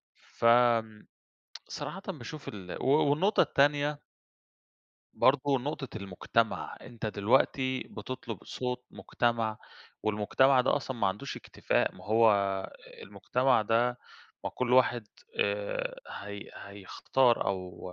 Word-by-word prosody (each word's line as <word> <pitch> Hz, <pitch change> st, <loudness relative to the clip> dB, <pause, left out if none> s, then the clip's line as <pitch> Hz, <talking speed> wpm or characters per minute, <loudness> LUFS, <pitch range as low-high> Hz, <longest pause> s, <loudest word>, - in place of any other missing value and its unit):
فآمم 115 Hz, -2 st, +2 dB, 0.6 s
صراحةً 195 Hz, -, -6 dB
باشوف 155 Hz, -4 st, -7 dB
ال 95 Hz, -4 st, -7 dB
و -, -, -1 dB, 0.2 s
والنقطة 190 Hz, +9 st, +3 dB
التانية 145 Hz, +1 st, +2 dB, 1.2 s
برضه 135 Hz, +1 st, +3 dB
نقطة 140 Hz, 0 st, -4 dB
المجتمع، 105 Hz, +3 st, -1 dB
أنت 115 Hz, -3 st, -7 dB
دلوقتي 130 Hz, +5 st, +1 dB
بتطلب 115 Hz, -2 st, -7 dB
صوت 125 Hz, 0 st, -4 dB
مجتمع, 115 Hz, -3 st, -1 dB, 0.4 s
والمجتمع 110 Hz, +6 st, +3 dB
ده 125 Hz, -, +2 dB
أصلًا 135 Hz, -3 st, -4 dB
ما 115 Hz, -, +1 dB
عندوش 105 Hz, +9 st, -3 dB
اكتفاء، -, -, -1 dB
ما -, -, -14 dB
هو 110 Hz, +1 st, +5 dB, 0.7 s
المجتمع 125 Hz, -2 st, +1 dB
ده 120 Hz, +3 st, +1 dB, 0.5 s
ما -, -, -2 dB
كل 125 Hz, -1 st, -2 dB
واحد 125 Hz, -3 st, +3 dB, 0.3 s
آآ 100 Hz, 0 st, -2 dB
هي 100 Hz, 0 st, -8 dB
هيختار 110 Hz, +5 st, 0 dB
أو 90 Hz, -1 st, -4 dB
120 Hz, 105 wpm, -30 LUFS, 105-130 Hz, 1.2 s, هو